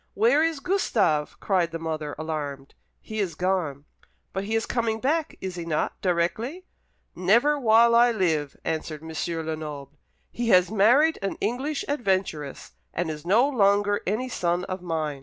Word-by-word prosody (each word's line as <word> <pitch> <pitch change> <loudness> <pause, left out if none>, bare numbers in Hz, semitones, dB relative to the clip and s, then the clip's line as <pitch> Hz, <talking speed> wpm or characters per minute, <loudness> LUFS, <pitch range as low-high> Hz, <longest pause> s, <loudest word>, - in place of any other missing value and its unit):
"Where 240 +8 +4
is 325 -3 0
Gustave?" 220 - +1
cried 185 -4 +1
the 165 - -5
mother, 155 -2 -4
alarmed. 145 -3 -5 0.3
"He 215 0 -6
is 185 -6 -1
gone." 160 -6 -1 0.5
"But 195 +1 -3
he 220 +2 -1
is 225 - +1
coming 230 -2 -1
back, 305 +5 -1
is 190 -1 -4
he 170 - -4
not, 160 -2 -2
directly?" 215 - -1 0.5
"Never 235 +11 +3
while 235 -1 +5
I 240 +1 +6
live!" 160 -9 0
answered 155 -1 -3
M. 160 - -8 0.3
Lenoble. 150 -3 -6 0.3
"He 235 0 -2
has 185 -1 +5
married 245 +10 +4
an 195 - -3
English 265 +8 -2
adventuress, 190 - -2 0.2
and 170 -2 -2
is 155 +2 -8
no 230 +8 +5
longer 205 -5 +2
any 220 +7 -1
son 175 -6 -1
of 185 0 -5
mine." 155 -5 -3
190 Hz, 160 wpm, -25 LUFS, 160-235 Hz, 0.5 s, I